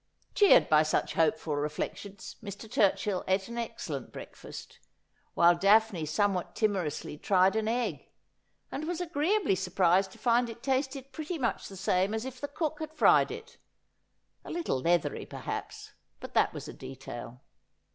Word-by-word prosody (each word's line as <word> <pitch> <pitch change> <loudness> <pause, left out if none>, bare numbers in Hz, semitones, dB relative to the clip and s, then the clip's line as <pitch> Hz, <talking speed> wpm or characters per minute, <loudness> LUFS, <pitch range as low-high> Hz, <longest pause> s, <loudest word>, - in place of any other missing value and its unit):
Cheered 405 -2 +6
by 155 -1 +5
such 155 0 0
hopeful 160 -1 +1
reflections, 150 +7 -4
Mr. 205 +2 -7
Turchill 200 -2 +1
ate 190 +1 +1
an 235 0 -4
excellent 230 - -5
breakfast, - - -10 0.6
while 170 +1 +6
Daphne 200 -2 +3
somewhat 190 +2 0
timorously 185 -9 -1
tried 190 +2 +3
an 220 -1 0
egg, 240 +2 -2 0.6
and 310 +3 -4
was 350 -1 -2
agreeably 350 - +1
surprised 185 0 +2
to - - -15
find 240 0 +2
it 230 +1 -10
tasted 270 0 -1
pretty 315 +2 -4
much 245 -6 -1
the 195 - -10
same 190 +3 +1
as 220 +2 -3
if 260 -1 -8
the 285 - -2
cook 305 +1 -3
had 315 0 -6
fried - - +5
it; 460 +1 -9 0.8
a - - -10
little 335 - -1
leathery, 170 +1 +1
perhaps, - - -6 0.3
but - - -9
that - - +3
was - - -7
a - - -7
detail. 130 -2 -9
205 Hz, 155 wpm, -30 LUFS, 175-265 Hz, 0.8 s, Cheered